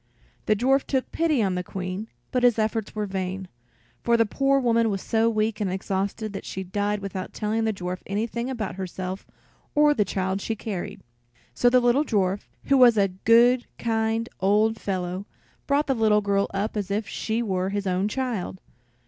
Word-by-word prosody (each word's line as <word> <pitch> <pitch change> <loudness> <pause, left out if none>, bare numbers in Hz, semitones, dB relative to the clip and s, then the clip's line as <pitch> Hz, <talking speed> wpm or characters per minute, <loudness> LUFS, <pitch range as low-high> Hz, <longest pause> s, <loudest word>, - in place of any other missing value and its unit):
The 215 - +4
dwarf 265 +5 +3
took 265 -2 -1
pity 310 -8 +2
on 190 -2 +1
the 180 0 -2
Queen, 185 +3 -5 0.2
but 250 - +1
his 245 -2 +4
efforts 220 0 -1
were 210 -1 -1
vain, 190 -1 -4 0.5
for 235 0 +3
the 230 - +4
poor 275 +5 +2
woman 230 -3 +2
was 195 -2 -1
so 225 0 +2
weak 215 -1 0
and 195 -3 0
exhausted 195 +3 -2
that 195 - -5
she 190 - -5
died 205 +2 -1
without 190 -1 -5
telling 220 +1 0
the 220 - +2
dwarf 180 -2 -4
anything 230 +5 -2
about 220 -7 -4
herself 185 0 -5 0.5
or 295 0 +5
the 215 - +2
child 190 0 -2
she 225 - -2
carried. 200 -4 -5 0.5
So 245 - +4
the 250 +1 +5
little 245 +4 +3
dwarf, 200 -6 0 0.2
who 275 - +3
was 240 -3 +7
a 200 -1 +3
good, 235 +6 +4
kind 225 0 0
old 210 +3 +2
fellow, 185 0 -3 0.4
brought 285 +1 +2
the 270 - +1
little 215 -3 +3
girl 200 -1 +1
up 200 +3 -2
as 205 -2 -2
if 205 +2 -1
she 225 +2 -2
were 190 -3 -1
his 200 0 -2
own 185 +1 +1
child. 220 -6 -3
215 Hz, 185 wpm, -25 LUFS, 195-230 Hz, 0.5 s, was